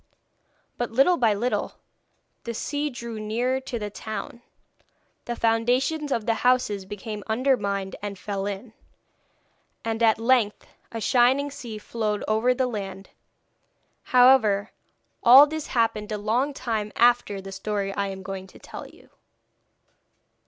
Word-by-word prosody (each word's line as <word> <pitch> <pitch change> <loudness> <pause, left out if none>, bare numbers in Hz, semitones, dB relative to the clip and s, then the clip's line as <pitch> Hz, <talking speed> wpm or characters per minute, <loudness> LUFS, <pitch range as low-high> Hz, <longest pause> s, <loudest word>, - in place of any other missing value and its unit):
But 240 - -1
little 270 +10 +4
by 225 -4 +3
little 240 +5 -1 0.7
the 235 -1 -5
sea 290 +5 -2
drew 235 -4 -7
nearer 240 +5 -1
to 260 -2 -5
the 210 -2 -5
town; 220 +3 -6 0.8
the 240 - -3
foundations 250 +7 +1
of 225 -4 0
the 230 - +2
houses 245 -6 +2
became 205 +1 -7
undermined 210 -5 0
and 200 -1 -5
fell 200 +1 -4
in, 205 +3 -6 1.1
and 225 0 -2
at 225 -1 +4
length 230 -2 +1 0.3
a 230 - -4
shining 260 +5 +3
sea 235 -5 -7
flowed 210 -1 -3
over 220 +3 +2
the 260 - +1
land. 195 -5 -6 0.9
However, 245 -5 +5 0.5
all 260 +4 +9
this 310 0 -5
happened 225 -3 0
a 210 - -1
long 230 +7 0
time 220 -5 -2
after 240 -4 +3
the 195 0 -9
story 200 0 -3
I 200 0 -1
am 190 -1 -7
going 190 0 -6
to - - -16
tell - - -9
you. - - -19
225 Hz, 140 wpm, -25 LUFS, 205-250 Hz, 1.1 s, all